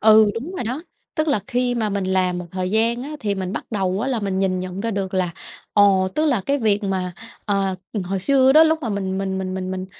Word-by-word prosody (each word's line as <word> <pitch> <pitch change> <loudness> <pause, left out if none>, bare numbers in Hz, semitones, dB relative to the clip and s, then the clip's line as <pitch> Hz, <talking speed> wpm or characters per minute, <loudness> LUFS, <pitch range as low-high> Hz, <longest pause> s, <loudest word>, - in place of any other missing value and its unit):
Ừ, 215 -1 +7
đúng 275 +11 -5
rồi - - -2
đó. 255 +8 -3 0.3
Tức 310 0 0
là 245 -8 +2
khi 245 -1 0
mà 220 -2 0
mình 200 -1 -1
làm 185 -1 +1
một 180 - -6
thời 185 0 -2
gian 230 +3 +2
á 290 - -6
thì 205 -2 0
mình 190 0 -3
bắt - - -4
đầu 195 -2 0
á 255 - -1
là 240 -4 0
mình 195 -2 -1
nhìn 190 -1 +1
nhận 185 +1 -5
ra 230 +1 -1
được 195 -2 -3
là, 185 -2 +1 0.4
ồ, 195 -2 +4
tức 310 +1 +2
là 255 -9 +2
cái 280 +1 +2
việc 210 -3 +2
mà, 185 -2 -1 0.3
ờ, 195 -2 0 0.3
hồi 190 +1 -2
xưa 265 +3 +4
đó 310 +2 +8
lúc 320 0 +2
mà 235 - -2
mình 195 -2 -2
mình 190 -1 -2
mình 185 0 -3
mình 185 0 -3
mình 185 0 -4
200 Hz, 260 wpm, -22 LUFS, 190-235 Hz, 0.4 s, đó